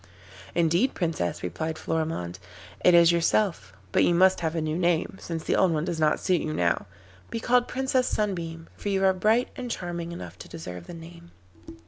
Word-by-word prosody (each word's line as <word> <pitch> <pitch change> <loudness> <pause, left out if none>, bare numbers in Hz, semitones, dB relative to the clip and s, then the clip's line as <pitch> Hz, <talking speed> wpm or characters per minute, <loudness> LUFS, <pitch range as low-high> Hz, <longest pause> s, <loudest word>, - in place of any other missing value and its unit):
'Indeed, 170 +9 +2
Princess,' 165 - -2
replied 155 - -3
Florimond, 155 - -3 0.4
'it 180 - +6
is 170 0 +7
yourself, 170 - +1 0.2
but - - +3
you 175 - +3
must 190 +2 +5
have 165 -1 -2
a - - +1
new 155 0 -2
name, 175 +1 0
since 165 -2 -5
the - - +1
old 185 - +4
one 155 0 -1
does 175 -3 -3
not 155 -1 +2
suit 180 -3 +1
you 155 - -3
now. 85 -1 0 0.4
Be 230 - -3
called 245 +1 +2
Princess 260 -1 0
Sunbeam, 170 -6 -2
for 205 - -4
you 195 -1 +1
are 190 0 +5
bright 215 +6 +2
and 250 -1 -5
charming 175 -4 -4
enough 170 - -8
to - - -10
deserve 90 - -8
the - - -8
name. 170 +1 -12
170 Hz, 190 wpm, -26 LUFS, 160-190 Hz, 0.4 s, is